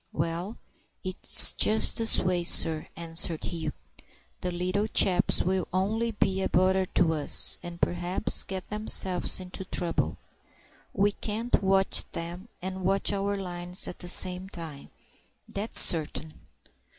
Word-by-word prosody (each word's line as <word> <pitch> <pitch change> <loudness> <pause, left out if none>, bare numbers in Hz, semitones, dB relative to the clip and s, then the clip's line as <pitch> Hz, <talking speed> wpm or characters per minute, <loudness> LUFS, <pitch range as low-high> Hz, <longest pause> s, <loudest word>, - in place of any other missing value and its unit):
"Well, 170 +7 -4 0.5
it's 185 0 +3
just 220 +1 +2
this 225 -1 +2
way, 180 -1 -1
sir," 160 -2 +5
answered 165 -1 -2
Hugh. 160 -3 -5 0.7
"The 180 - -3
little 185 +4 -3
chaps 185 -3 +4
will 185 +1 -2
only 210 +5 -2
be 195 -3 -2
a - - -2
bother 190 +1 +1
to 165 -2 +2
us, 150 -2 +4
and 175 -1 -10
perhaps 175 +4 0
get 190 0 -8
themselves 195 -4 +2
into 185 +1 -7
trouble. 175 -2 -2 0.7
We 205 +1 0
can't 220 +3 -3
watch 195 0 +1
them 175 +4 -7 0.2
and 190 0 -6
watch 195 +2 0
our 200 0 -3
lines 180 -1 -3
at - - -8
the 175 - -6
same 185 +1 +2
time, 160 -6 -10 0.6
that's 205 +3 0
certain." 155 -1 +2
185 Hz, 135 wpm, -26 LUFS, 175-195 Hz, 0.7 s, sir